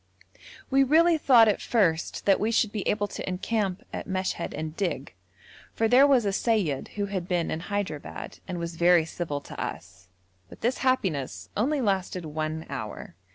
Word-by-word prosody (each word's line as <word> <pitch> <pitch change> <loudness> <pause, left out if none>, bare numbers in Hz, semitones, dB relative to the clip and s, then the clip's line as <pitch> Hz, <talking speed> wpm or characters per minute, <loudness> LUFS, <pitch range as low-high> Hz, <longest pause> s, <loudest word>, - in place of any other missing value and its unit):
We 270 +1 +5
really 320 +4 +4
thought 240 -6 +6
at 210 - +1
first 170 -9 0
that 195 -1 +4
we 215 - +1
should 225 -2 +2
be 210 - -3
able 205 -1 +1
to - - -5
encamp 190 0 -2
at - - -5
Meshed 185 -2 -2
and 155 +1 -5
dig, 170 - -3 0.6
for 225 - +2
there 255 +5 +6
was 260 -6 +4
a 200 - 0
seyyid 195 - 0
who 205 -1 -1
had 190 -3 -4
been 175 -2 0
in 160 - -2
Hyderabad 185 -5 -5
and 180 -2 -4
was 170 -1 -5
very 175 -1 +5
civil 160 -3 -4
to - - -8
us, 95 +1 -8 0.4
but - - -14
this 245 +3 0
happiness 140 - -1
only 275 +7 +1
lasted 190 -5 -1
one 155 +1 -3
hour. 110 -10 -6
190 Hz, 175 wpm, -27 LUFS, 160-225 Hz, 0.6 s, thought